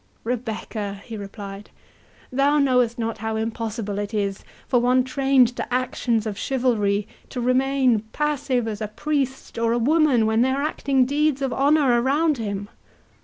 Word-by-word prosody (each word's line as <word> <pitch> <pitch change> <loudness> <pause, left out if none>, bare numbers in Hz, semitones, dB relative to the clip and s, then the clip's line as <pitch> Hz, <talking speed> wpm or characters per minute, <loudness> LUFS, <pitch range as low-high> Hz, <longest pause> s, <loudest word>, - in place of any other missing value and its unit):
"Rebecca," 220 -4 -4
he 230 - -7
replied, 200 0 -8 0.6
"thou 275 +3 +3
knowest 250 -4 +2
not 225 -2 -3
how 220 +1 -2
impossible 220 -2 -3
it 205 +2 -4
is 200 -2 -2 0.2
for 245 - +3
one 250 +1 +3
trained 260 -2 +3
to - - -4
actions 245 -3 0
of 210 -2 -4
chivalry 215 -6 0 0.2
to 250 - -5
remain 255 -1 +2
passive 275 -5 -1
as 215 -1 -4
a 215 - -1
priest, 265 +2 -3
or 230 0 +2
a - - +1
woman, 275 -2 +3
when 220 +1 +2
they 255 - +3
are 275 +2 0
acting 275 -4 +1
deeds 285 0 +1
of 265 - -1
honour 275 -4 +3
around 290 +2 +1
him. 200 -2 -3
245 Hz, 160 wpm, -23 LUFS, 220-270 Hz, 0.6 s, thou